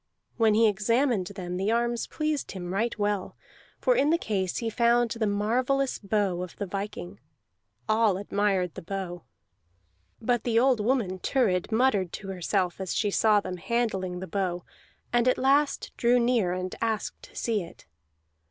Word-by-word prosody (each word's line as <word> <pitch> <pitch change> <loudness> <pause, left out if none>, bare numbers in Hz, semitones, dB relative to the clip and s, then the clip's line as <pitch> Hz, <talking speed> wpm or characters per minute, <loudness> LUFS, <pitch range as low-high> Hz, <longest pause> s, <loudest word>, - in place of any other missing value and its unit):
When 220 -2 +4
he 225 +1 +5
examined 215 0 +1
them 180 -2 -5
the 195 +3 0
arms 235 0 0
pleased 305 -2 -2
him 180 -1 -5
right 230 +5 -1
well, 205 -2 -1 0.4
for - - +3
in 290 - +3
the 335 - +4
case 195 - -2
he 230 - -2
found 235 0 +2
the 225 -1 -1
marvellous 250 +7 0
bow 195 -3 0
of 180 -1 -7
the 200 - -4
viking. 185 - -6 0.7
All 215 -3 +3
admired 195 -3 0
the - - -8
bow. 180 -1 -5 1.0
But 240 0 0
the 230 -2 +1
old 250 0 +4
woman 215 -6 0
Thurid 200 -6 +1
muttered 220 -6 +2
to 195 - -6
herself 185 0 -1
as 190 - -3
she 205 - +1
saw 210 0 +4
them 180 -2 -5
handling 190 -4 -1
the - - -4
bow, 180 -1 -2 0.5
and 240 0 +3
at 255 - +3
last 280 +2 +2
drew 245 +1 +4
near 235 -6 +2
and 185 0 -3
asked 225 -2 -2
to - - -15
see 225 -3 0
it. 170 - -12
210 Hz, 165 wpm, -27 LUFS, 185-240 Hz, 1.0 s, he